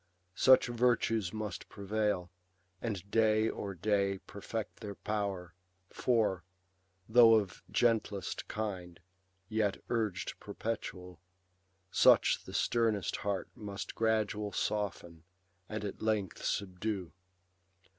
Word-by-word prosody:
Such 130 Hz, +7 st, +6 dB
virtues 115 Hz, -5 st, +1 dB
must 105 Hz, -3 st, -5 dB
prevail, 100 Hz, -3 st, -1 dB, 0.5 s
and 100 Hz, -5 st, -3 dB
day 110 Hz, 0 st, +3 dB
o'er 100 Hz, -2 st, -5 dB
day 100 Hz, +1 st, +1 dB
Perfect 105 Hz, +1 st, -5 dB
their 100 Hz, -2 st, -6 dB
power; 100 Hz, -5 st, -3 dB, 0.4 s
for, 110 Hz, -7 st, +1 dB, 0.6 s
though 115 Hz, 0 st, +8 dB
of 100 Hz, -5 st, 0 dB
gentlest 110 Hz, -5 st, 0 dB
kind. 95 Hz, -5 st, -4 dB, 0.5 s
Yet 110 Hz, -2 st, 0 dB
urg'd 110 Hz, -5 st, -1 dB
perpetual, 90 Hz, -5 st, -5 dB, 0.7 s
such -, -, +5 dB
the -, -, -9 dB
sternest 115 Hz, -4 st, +1 dB
heart 100 Hz, -1 st, -2 dB
Must 100 Hz, -1 st, -6 dB
gradual 105 Hz, -2 st, 0 dB
soften, 85 Hz, -6 st, -2 dB, 0.5 s
and 105 Hz, -1 st, -4 dB
at 100 Hz, -, -6 dB
length 105 Hz, -4 st, -1 dB
subdue. 95 Hz, -2 st, -2 dB
105 Hz, 100 wpm, -33 LUFS, 95-110 Hz, 0.7 s, though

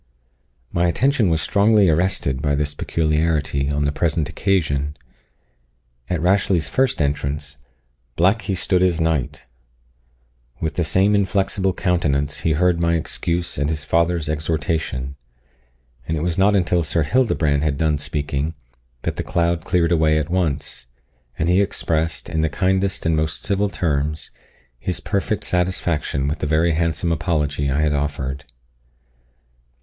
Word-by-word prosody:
My 85 Hz, +1 st, +1 dB
attention 125 Hz, -, +2 dB
was 80 Hz, -1 st, +1 dB
strongly 105 Hz, -1 st, +4 dB
arrested 80 Hz, -5 st, +1 dB
by 70 Hz, -1 st, +1 dB
this 75 Hz, 0 st, -1 dB
peculiarity 75 Hz, -2 st, 0 dB
on 75 Hz, 0 st, 0 dB
the 70 Hz, -, +1 dB
present 80 Hz, 0 st, 0 dB
occasion. 75 Hz, -7 st, 0 dB, 1.1 s
At 90 Hz, -2 st, 0 dB
Rashleigh's 90 Hz, -3 st, +2 dB
first 130 Hz, -1 st, +1 dB
entrance, 70 Hz, 0 st, -2 dB, 0.6 s
"black 95 Hz, +6 st, +3 dB
he 100 Hz, -, -2 dB
stood 90 Hz, 0 st, +1 dB
as 90 Hz, -2 st, +2 dB
night!" 80 Hz, -5 st, -1 dB, 1.1 s
With 80 Hz, -2 st, -2 dB
the 85 Hz, -, 0 dB
same 95 Hz, +6 st, +3 dB
inflexible 95 Hz, -1 st, +1 dB
countenance 75 Hz, -6 st, 0 dB
he 80 Hz, -, +1 dB
heard 90 Hz, +2 st, +2 dB
my 85 Hz, 0 st, +2 dB
excuse 85 Hz, 0 st, -2 dB
and 70 Hz, 0 st, 0 dB
his 75 Hz, -2 st, -2 dB
father's 85 Hz, -1 st, +1 dB
exhortation; 75 Hz, -3 st, -2 dB, 0.9 s
and 80 Hz, -, -1 dB
it 75 Hz, -, -2 dB
was 85 Hz, -1 st, 0 dB
not 100 Hz, +2 st, +3 dB
until 90 Hz, -2 st, +2 dB
Sir 80 Hz, 0 st, 0 dB
Hildebrand 75 Hz, -, +1 dB
had 75 Hz, -3 st, 0 dB
done 75 Hz, -1 st, +1 dB
speaking, 75 Hz, +1 st, -2 dB, 0.5 s
that -, -, -3 dB
the -, -, -2 dB
cloud 85 Hz, -1 st, 0 dB
cleared 85 Hz, -1 st, +1 dB
away 80 Hz, -2 st, +3 dB
at 75 Hz, +2 st, -2 dB
once, 80 Hz, -9 st, -2 dB, 0.5 s
and 75 Hz, -, 0 dB
he 90 Hz, +3 st, +4 dB
expressed, 80 Hz, -4 st, -1 dB
in 80 Hz, -, -1 dB
the 80 Hz, -, +1 dB
kindest 95 Hz, +4 st, 0 dB
and 80 Hz, 0 st, +2 dB
most 80 Hz, 0 st, -1 dB
civil 100 Hz, 0 st, +1 dB
terms, 75 Hz, -4 st, -2 dB, 0.5 s
his 90 Hz, -, -2 dB
perfect 100 Hz, 0 st, -2 dB
satisfaction 85 Hz, -6 st, 0 dB
with 75 Hz, +2 st, -2 dB
the 75 Hz, -, -2 dB
very 80 Hz, +3 st, +2 dB
handsome 85 Hz, +1 st, 0 dB
apology 75 Hz, -3 st, 0 dB
I 70 Hz, +3 st, +1 dB
had 75 Hz, -1 st, +2 dB
offered. 70 Hz, -1 st, -3 dB
80 Hz, 145 wpm, -21 LUFS, 75-90 Hz, 1.1 s, strongly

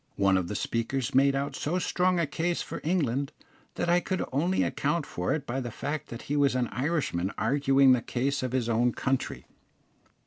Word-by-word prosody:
One 100 Hz, -1 st, +3 dB
of 95 Hz, -2 st, 0 dB
the 105 Hz, -, -4 dB
speakers 115 Hz, +5 st, -2 dB
made 135 Hz, +1 st, +4 dB
out 140 Hz, +1 st, -2 dB
so 165 Hz, +5 st, -1 dB
strong 180 Hz, 0 st, +1 dB
a 170 Hz, -, +2 dB
case 170 Hz, +4 st, -1 dB
for -, -, -7 dB
England, 140 Hz, -5 st, 0 dB, 0.4 s
that -, -, -1 dB
I 175 Hz, +1 st, +4 dB
could 185 Hz, +1 st, -2 dB
only 170 Hz, +8 st, +1 dB
account 170 Hz, -3 st, -1 dB
for 90 Hz, +1 st, -3 dB
it 150 Hz, -2 st, -1 dB
by 130 Hz, +1 st, -2 dB
the 120 Hz, -2 st, -4 dB
fact 145 Hz, +7 st, -4 dB
that 115 Hz, -, -8 dB
he 145 Hz, -, -2 dB
was 140 Hz, -2 st, +3 dB
an 125 Hz, -2 st, 0 dB
Irishman 125 Hz, -, -1 dB
arguing 135 Hz, +2 st, +4 dB
the 125 Hz, -2 st, +4 dB
case 135 Hz, +5 st, -1 dB
of 130 Hz, -1 st, -2 dB
his 125 Hz, -2 st, 0 dB
own 120 Hz, +1 st, +2 dB
country. 135 Hz, -1 st, -2 dB
135 Hz, 200 wpm, -28 LUFS, 120-155 Hz, 0.4 s, made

